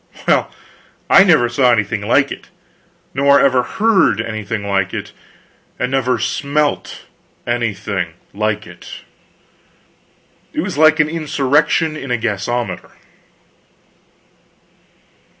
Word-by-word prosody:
well, - - +2 0.6
I 195 - +8
never 155 -11 +4
saw 125 +1 +2
anything 105 -2 0
like 130 +6 +2
it. - - -9 0.6
Nor 140 +1 +4
ever 130 -2 +3
heard 195 - +2
anything 110 -2 -4
like 100 -2 -1
it. - - -6 0.6
And 125 - -2
never 130 -2 +1
smelt 145 +5 -2 0.4
anything 105 -7 -2 0.2
like 105 0 -2
it. - - -13 1.6
It - - -1
was - - -4
like 155 +1 +5
an 155 - +4
insurrection 150 0 +1
in 140 -3 -7
a 125 - +1
gasometer. 115 0 -3
125 Hz, 105 wpm, -17 LUFS, 110-145 Hz, 1.6 s, I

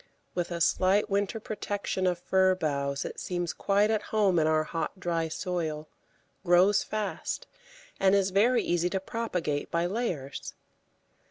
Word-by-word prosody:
With 175 -1 -2
a 170 -1 -4
slight 190 +4 +3
winter 200 +2 0
protection 205 -3 -2
of 180 -1 +1
fir 190 +1 +3
boughs 140 -4 -1
it - - -6
seems 175 -2 -2
quite 205 +2 +2
at 220 - +1
home 200 -5 +3
in 155 - +2
our 155 0 +3
hot, 165 +4 -4
dry 165 -2 -1
soil, 160 -3 -3 0.5
grows 185 +3 +5
fast, 215 -1 -3 0.5
and 195 0 +4
is 195 -1 +2
very 230 +6 +3
easy 175 0 +1
to 190 - -1
propagate 185 -8 -3
by 170 +1 0
layers. 175 - -3
185 Hz, 150 wpm, -28 LUFS, 165-200 Hz, 0.5 s, grows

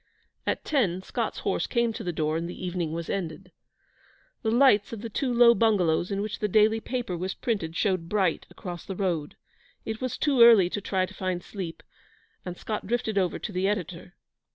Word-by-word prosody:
At - - -1
ten 190 - +1
Scott's - - -3
horse - - -1
came 235 -2 +1
to - - -6
the 175 - -2
door, 155 -1 -1
and 165 +1 -2
the 180 - -7
evening 175 -3 -2
was 165 0 -4
ended. 180 0 -4 0.9
The 220 - 0
lights 235 -3 +4
of 225 -3 -6
the 230 -1 -6
two 260 +4 -1
low 235 0 +7
bungalows 185 -8 +2
in 200 0 -1
which 215 0 -5
the 210 - 0
daily 215 +2 +4
paper 240 -5 -3
was 185 +2 -3
printed 185 -9 -2
showed 185 -2 0
bright 190 -6 0
across 175 -2 -7
the 190 - -6
road. 170 -6 -2 0.5
It 220 +2 -4
was 255 -2 -2
too 275 -5 +2
early 220 -7 +8
to 205 - -3
try 190 -1 0
to - - -13
find 185 -2 -3
sleep, 180 -5 -7 0.6
and 180 -1 -6
Scott 215 -3 -4
drifted 220 -2 0
over 185 -2 0
to 215 - -6
the 185 0 0
editor. 180 -3 -4
195 Hz, 200 wpm, -27 LUFS, 175-220 Hz, 0.9 s, early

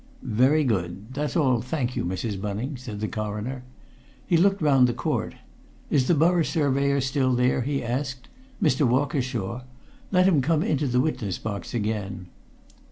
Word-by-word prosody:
"Very 130 +7 +3
good. 100 -1 -2
That's 145 +2 -2
all, 130 -7 +3
thank 125 -1 -2
you, - - -1
Mrs. 95 +3 -3
Bunning," 105 +8 -3
said 120 -5 -7
the 110 - -1
Coroner. 110 +5 -4 0.6
He 175 - +2
looked 195 +4 +4
round 135 -5 +4
the 120 - -2
court. - - -2 0.6
"Is 130 -3 +3
the 175 - +4
Borough 170 +3 +3
Surveyor 140 -3 +1
still 130 -1 +1
there?" 125 +1 +2
he 140 +2 -1
asked. 130 +2 -3 0.3
"Mr. 150 - +2
Walkershaw? 125 -4 -1 0.5
Let 185 -1 +4
him 165 -7 +4
come 155 +3 +1
into 145 -1 0
the 125 0 +2
witness 115 - -2
box 105 +2 -5
again." 105 -4 -3
130 Hz, 160 wpm, -25 LUFS, 110-145 Hz, 0.6 s, looked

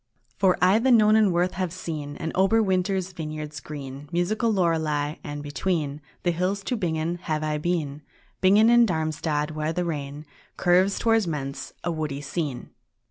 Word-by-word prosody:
II - - -37
For 190 -2 +4
I 190 +4 +5
the 260 +3 +2
Nonnenwerth 210 -6 +4
have 185 -2 -3
seen, 155 -5 -5
And 160 -1 -4
Oberwinter's 190 -2 +2
vineyards 155 -2 -6
green, 140 -1 -8
Musical 215 +7 +1
Lurlei; 160 -5 0
and 145 0 -6
between 150 -1 -2 0.2
The 175 - +2
hills 185 +4 -1
to 250 - -1
Bingen 170 -3 -2
have 155 -3 -2
I 150 -1 -1
been, 150 -3 -2 0.4
Bingen 210 +5 +6
in 240 -1 +6
Darmstadt, 155 -2 -1
where 155 0 -2
the 180 +1 -1
Rhene 145 -2 -4 0.3
Curves 185 +3 +3
towards 225 -4 +2
Mentz, 140 -3 -4
a 175 - -1
woody 155 -4 -3
scene. 145 -2 -4
170 Hz, 155 wpm, -25 LUFS, 150-190 Hz, 0.4 s, Bingen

